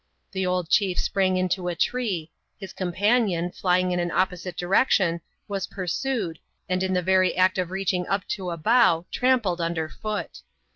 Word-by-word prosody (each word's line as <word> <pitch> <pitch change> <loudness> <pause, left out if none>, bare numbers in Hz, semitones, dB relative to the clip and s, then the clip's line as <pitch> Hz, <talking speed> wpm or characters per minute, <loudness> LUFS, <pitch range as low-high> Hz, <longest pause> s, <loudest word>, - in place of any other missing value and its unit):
The 190 -1 -1
old 180 -2 0
chief 190 0 +2
sprang 190 -2 +1
into 185 0 -1
a 175 - -1
tree; 185 -5 -1 0.3
his 195 -2 -9
companion, 185 -1 +1
fljing 180 0 +1
in 180 - 0
an 175 0 -1
opposite 180 0 -1
direction^ 180 -2 +2 0.3
was 195 -2 -3
par 185 -2 -6
sued, 185 - -2 0.3
and 185 0 0
in 190 0 0
the 180 - +1
very 185 0 +3
act 185 0 +3
of 180 -2 -1
reaching 185 -1 -1
up 195 0 -1
to 185 -3 -3
a 170 - -4
bough, 180 -3 +3
trampled 235 -9 +1
under 165 -1 -1
foot. 215 +3 -5
185 Hz, 175 wpm, -25 LUFS, 175-195 Hz, 0.3 s, very